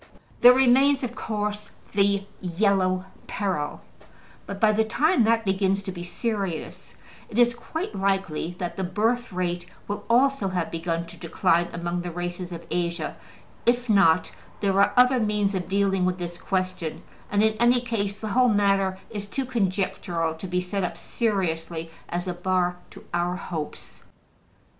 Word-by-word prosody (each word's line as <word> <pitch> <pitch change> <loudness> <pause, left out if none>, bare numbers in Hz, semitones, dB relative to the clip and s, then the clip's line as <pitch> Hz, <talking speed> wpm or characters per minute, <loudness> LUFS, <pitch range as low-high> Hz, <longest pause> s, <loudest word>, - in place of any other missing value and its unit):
There 245 +1 +10
remains, 265 +2 +4
of 245 -1 -3
course, 210 -3 -3 0.2
the 200 -1 +2 0.2
Yellow 185 0 +1 0.2
Peril; 185 -8 -2 0.7
but 200 - -5
by 220 0 +5
the 215 +1 +2
time 285 +5 +3
that 225 0 +2
begins 195 0 +1
to 195 - -4
be 175 -1 -7
serious 195 -2 -4 0.3
it 220 - -6
is 240 0 +5
quite 320 - -5
likely 190 -4 -1
that 175 -1 -4
the 190 - -1
birth 225 +6 0
rate 175 -1 -2 0.2
will 205 - -4
also 255 -2 +3
have 180 -3 -2
begun 165 0 -2
to - - -13
decline 170 0 +1
among 175 +1 -3
the 175 - -4
races 175 +1 -5
of 170 -1 -7
Asia 170 0 -2 0.5
If 240 -1 +2
not, 185 -5 +4 0.3
there 195 -1 +2
are 200 - +4
other 250 +1 +6
means 210 -2 +1
of 185 -2 -3
dealing 195 -1 +2
with 180 0 +1
this 175 -1 -6
question; 185 -4 -2 0.3
and 205 +1 +2
in 220 0 +3
any 240 +1 +5
case 220 -5 -2
the 215 +1 -5
whole 250 +4 +4
matter 195 -2 +2
is 205 -2 -5
too 265 +6 -2
conjectural 185 -7 -1
to 160 +4 -7
be 180 0 0
set 190 +2 -2
up 180 - -3
seriously 165 -7 -2 0.2
as 175 +2 -3
a 180 - -1
bar 180 0 0
to - - -14
our 175 +1 0
hopes. 160 -4 -6
195 Hz, 160 wpm, -25 LUFS, 175-220 Hz, 0.7 s, There